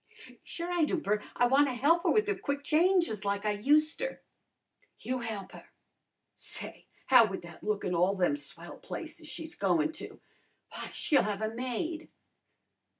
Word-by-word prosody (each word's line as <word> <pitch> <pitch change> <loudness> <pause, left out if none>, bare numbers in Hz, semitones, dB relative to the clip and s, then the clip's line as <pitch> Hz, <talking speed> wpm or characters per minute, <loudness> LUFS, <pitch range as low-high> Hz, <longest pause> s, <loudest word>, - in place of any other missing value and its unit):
"Sure 345 +1 -5
I 350 -2 +2
do, 310 - +1
Bert. 210 -8 -1
I 245 - +4
wanna 270 +1 +3
he'p 310 +8 +3
her - - +1
with 430 -1 +3
her 415 - +2
quick 285 -6 -3
changes 335 - +2
like 200 0 -1
I 210 - +2
useter." 305 - +1 0.7
"You 255 0 -3
he'p 215 -5 -5
her! - - -13 0.6
Say, - - -5 0.2
how 250 -4 +7
would 190 -3 -6
that 170 -1 -12
look 210 -1 -1
in 180 - -1
all 180 +3 +3
them 180 -6 +2
swell 165 +4 -8
places 325 -1 -7
she's 320 +2 -4
goin' 315 -1 +1
to? - - -8 0.5
W'y, - - -6
she'll 285 - +2
have 210 0 -2
a 220 +1 -2
maid!" 260 +7 -3
255 Hz, 165 wpm, -30 LUFS, 205-320 Hz, 0.7 s, how